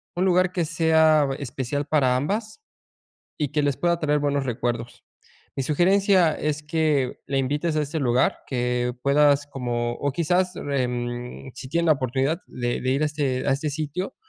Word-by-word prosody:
un 180 +2 +1
lugar 180 0 +3
que 175 -3 -1
sea 160 -2 +3
especial 140 +1 -3
para 135 -5 +2
ambas, 215 - -3 0.8
y 150 -2 0
que 150 0 0
les 140 -2 +1
pueda 170 -1 +1
traer 150 -2 +1
buenos 140 -1 0
recuerdos. 120 -1 -3 0.5
Mi 135 - 0
sugerencia 185 +3 +3
es 150 0 -2
que 150 -4 0
la 135 0 -1
invites 145 +5 -1
a 155 - +2
este 155 +3 -3
lugar 125 -2 +2
que 125 -1 -1
puedas 145 0 +3
como, 120 -3 -2
o 145 +1 -2
quizás 180 +4 +1
em, 125 -2 -3
si 130 - -8
tiene 170 +3 0
la 155 - +6
oportunidad 135 +3 -1
de 120 -1 -3
de 130 - -1
ir 135 +3 +1
a 155 - +3
este 140 -4 -2
a - - +4
este 145 +3 -1
sitio, 155 - -4
145 Hz, 170 wpm, -24 LUFS, 130-160 Hz, 0.8 s, la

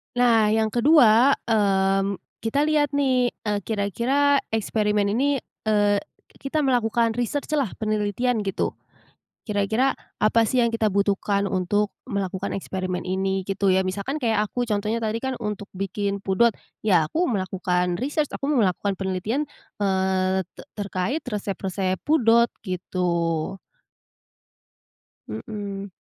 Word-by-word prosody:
Nah 235 -3 +4
yang 220 -1 +1
kedua, 250 -1 +6
mmm 195 -2 +2 0.2
kita 230 +6 0
lihat 295 -2 +2
nih 260 -3 +2
e 210 - -4
kira-kira 235 +8 +1 0.2
eksperimen 210 -1 +1
ini, 275 +4 +1 0.3
eee 205 -1 +3 0.4
kita 275 +3 -2
melakukan 235 -4 +2
riset 245 +4 -1
lah 270 -8 0
penelitian 215 +2 0
gitu. 195 - -2 0.7
Kira-kira 220 +6 +1 0.2
apa 225 +2 +4
sih 250 +3 +2
yang 235 - +3
kita 230 -1 0
butuhkan 200 0 +1
untuk 200 +2 0 0.2
melakukan 200 -4 -3
eksperimen 185 -1 -3
ini 190 +1 -1
gitu 195 0 +1
ya, 190 - +3
misalkan 200 +11 -3
kayak 220 -3 +2
aku 245 +4 -4
contohnya 210 +2 -1
tadi 220 0 -1
kan 265 +3 -3
untuk 210 -2 -4
bikin 200 +1 -3
pudot 210 +4 +3 0.3
ya 175 -7 +3
aku 345 +3 +1
melakukan 180 - -1
riset, 295 +3 -1
aku - - -5
melakukan 205 -8 +1
penelitian 195 +10 -2 0.3
eee 190 -1 +1
te - - -10 0.2
terkait 205 - -2
resep-resep 195 -2 -2
pudot 235 -6 +4
gitu. 175 -2 -2 1.7
Mhm. 200 - -6
210 Hz, 120 wpm, -24 LUFS, 190-240 Hz, 1.7 s, kedua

